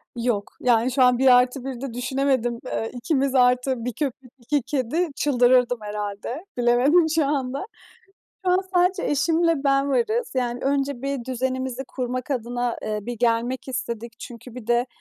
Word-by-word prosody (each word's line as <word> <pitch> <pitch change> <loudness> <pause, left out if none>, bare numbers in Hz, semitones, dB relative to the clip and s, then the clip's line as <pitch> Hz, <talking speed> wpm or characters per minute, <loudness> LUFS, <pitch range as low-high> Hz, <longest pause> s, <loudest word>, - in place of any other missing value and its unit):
Yok. 235 -4 -2
Yani 240 0 +2
şu 255 0 +3
an 250 -1 +5
1+1'de 255 0 +2
düşünemedim. 250 -1 0
Eee, 225 -2 -3
ikimiz 265 +2 0
artı 250 -1 +2
1 250 - -2
köpek, 265 -1 -4
2 280 +5 0
kedi 270 +6 -1
çıldırırdım 250 -3 +3
herhâlde. 210 - -5
Bilemedim 250 +8 +4
şu 315 -3 +3
anda. 275 +2 -2 0.8
Şu - - +4
an 365 - +4 0.2
sadece 360 +1 +3
eşimle 330 +3 +2
ben 275 0 +3
varız. 465 - 0
Yani 245 -1 -1
önce 275 -2 0
bir 275 -3 -3
düzenimizi 260 0 -2
kurmak 255 +1 -4
adına, 245 -1 -2
eee, 215 0 -2
bir 240 +1 -6
gelmek 240 +3 0
istedik. 235 -3 -4
Çünkü 240 -1 -10
bir 245 -3 -9
de 240 +1 +2
255 Hz, 150 wpm, -24 LUFS, 240-275 Hz, 0.8 s, an